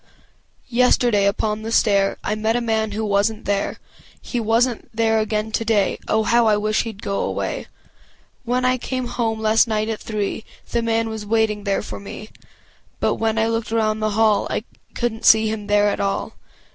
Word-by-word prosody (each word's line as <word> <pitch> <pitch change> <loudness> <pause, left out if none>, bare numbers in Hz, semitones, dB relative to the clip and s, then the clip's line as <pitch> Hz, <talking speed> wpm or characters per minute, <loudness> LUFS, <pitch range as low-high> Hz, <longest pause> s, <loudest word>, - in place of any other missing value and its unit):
Yesterday 240 -4 +3
upon 210 +1 -1
the 225 +1 -5
stair 200 -3 +3
I - - -1
met 220 +1 0
a - - +2
man 220 -2 -1
who 220 +1 -2
wasnât 210 +1 0
there 200 0 -1 0.4
He 245 - -4
wasnât 230 +2 +1
there 225 0 +2
again 215 0 -1
today 220 -3 +1
I - - +1
wish, 220 +1 +1
I 225 -3 +4
wish 215 +1 0
heâd 220 -3 -7
go 200 0 -2
away - - -3 0.8
When 250 +1 0
I 255 0 +2
came 255 +1 -3
home 225 -2 -2
last 220 +2 +3
night 215 0 -1
at 220 - -3
three 215 -1 -3 0.3
The 235 - +1
man 230 0 0
was 220 -1 -5
waiting 215 -1 0
there 200 -1 0
for - - -7
me 210 +1 -9 0.7
But - - +1
when 225 0 0
I 220 - +3
looked 225 0 -2
around 220 -1 +1
the 215 -1 -1
hall 220 -2 +3
I - - -2 0.3
couldnât 235 -2 -2
see 220 0 +6
him 210 -1 -4
there 205 0 +3
at - - -2
all! 195 0 -2
220 Hz, 185 wpm, -21 LUFS, 210-225 Hz, 0.8 s, see